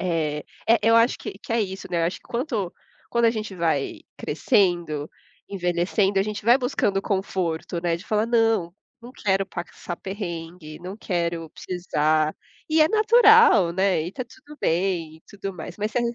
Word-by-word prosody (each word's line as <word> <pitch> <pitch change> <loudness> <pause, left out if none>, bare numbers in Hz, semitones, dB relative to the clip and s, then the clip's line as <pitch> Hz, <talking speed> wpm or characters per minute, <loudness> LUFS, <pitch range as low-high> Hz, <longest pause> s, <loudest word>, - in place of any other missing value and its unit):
É, 160 -4 -1 0.3
eh, 230 - +6
eu 230 +1 +5
acho 230 +2 +4
que - - -6
que 225 - -6
é 230 - +2
isso, 190 -2 -4
né, 170 -1 0
eu 165 - +3
acho 175 - -2
que - - -33
quanto 235 - -2 0.4
quando 235 0 +1
a 230 - +5
gente 215 -3 -5
vai 160 -6 -1 0.2
crescendo, 170 - +1 0.4
envelhecendo, 190 +1 0
a - - +4
gente 210 0 -5
vai 240 +3 +6
buscando 210 -6 0
conforto, 185 -4 -2
né, 170 -1 0
de 170 - -12
falar: 215 +1 +1
"Não, 225 -7 +2 0.3
não 240 +2 -11
quero 195 -4 0
passar 175 -2 -7
perrengue, 170 -5 -7
não 185 +3 -7
quero 170 -5 -2
precisar", 155 -3 0 0.3
e 315 0 +3
é 310 - +6
natural, 435 - +6
né, 190 -3 +2
e 170 - -4
tá 255 - -5
tudo 300 +3 -15
bem 165 -2 0
e - - -33
tudo 195 -1 -6
mais. 170 +2 -8
Mas 210 +1 -2
se - - +1
a - - +1
190 Hz, 180 wpm, -24 LUFS, 170-225 Hz, 0.4 s, eh